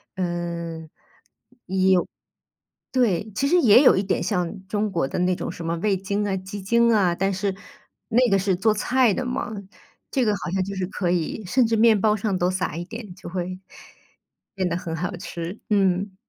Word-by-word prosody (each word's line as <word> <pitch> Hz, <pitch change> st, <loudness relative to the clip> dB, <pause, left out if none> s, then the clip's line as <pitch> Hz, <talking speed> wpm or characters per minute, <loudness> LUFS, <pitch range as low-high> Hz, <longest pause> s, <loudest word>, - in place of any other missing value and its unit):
嗯。 170 Hz, -2 st, -3 dB
有 160 Hz, -, -15 dB, 2.0 s
对， 220 Hz, -5 st, +1 dB
其 275 Hz, +5 st, 0 dB
实 360 Hz, -, +4 dB
也 240 Hz, +4 st, +7 dB
有 255 Hz, -, +6 dB
一 190 Hz, -, +1 dB
点 195 Hz, -, -1 dB
像 190 Hz, 0 st, -2 dB
中 210 Hz, 0 st, -1 dB
国 165 Hz, -7 st, -1 dB
的 -, -, -4 dB
那 180 Hz, 0 st, +2 dB
种 -, -, -4 dB
什 170 Hz, -, -8 dB
么 165 Hz, +1 st, -1 dB
味 195 Hz, +3 st, +1 dB
精 200 Hz, +2 st, -2 dB
啊、 190 Hz, -, 0 dB
鸡 190 Hz, +2 st, -7 dB
精 235 Hz, +3 st, +3 dB
啊， 190 Hz, -5 st, +3 dB
但 195 Hz, +3 st, 0 dB
是 190 Hz, +1 st, -1 dB, 0.5 s
那 245 Hz, +2 st, +3 dB
个 195 Hz, -, +4 dB
是 190 Hz, -1 st, +1 dB
做 215 Hz, +3 st, +2 dB
菜 245 Hz, 0 st, +2 dB
的 260 Hz, -, -2 dB
嘛， 250 Hz, -1 st, -3 dB, 0.6 s
这 260 Hz, -3 st, +1 dB
个 210 Hz, -, +3 dB
好 180 Hz, -, -5 dB
像 190 Hz, -1 st, +1 dB
就 200 Hz, +1 st, -5 dB
是 185 Hz, -, -1 dB
可 185 Hz, -3 st, -2 dB
以， 175 Hz, +4 st, -1 dB
甚 245 Hz, +4 st, +3 dB
至 225 Hz, -, 0 dB
面 220 Hz, -1 st, +5 dB
包 210 Hz, 0 st, +3 dB
上 200 Hz, -2 st, -1 dB
都 180 Hz, +1 st, +1 dB
撒 185 Hz, -4 st, -2 dB
一 175 Hz, -, -4 dB
点， 215 Hz, -2 st, -9 dB
就 180 Hz, -, -10 dB
会， 185 Hz, 0 st, -4 dB, 1.0 s
变 185 Hz, -2 st, -1 dB
得 170 Hz, -, -1 dB
很 170 Hz, -2 st, -5 dB
好 180 Hz, +3 st, -3 dB
吃， 175 Hz, +1 st, -6 dB
嗯。 195 Hz, -1 st, +1 dB
195 Hz, 210 characters per minute, -24 LUFS, 180-215 Hz, 2.0 s, 也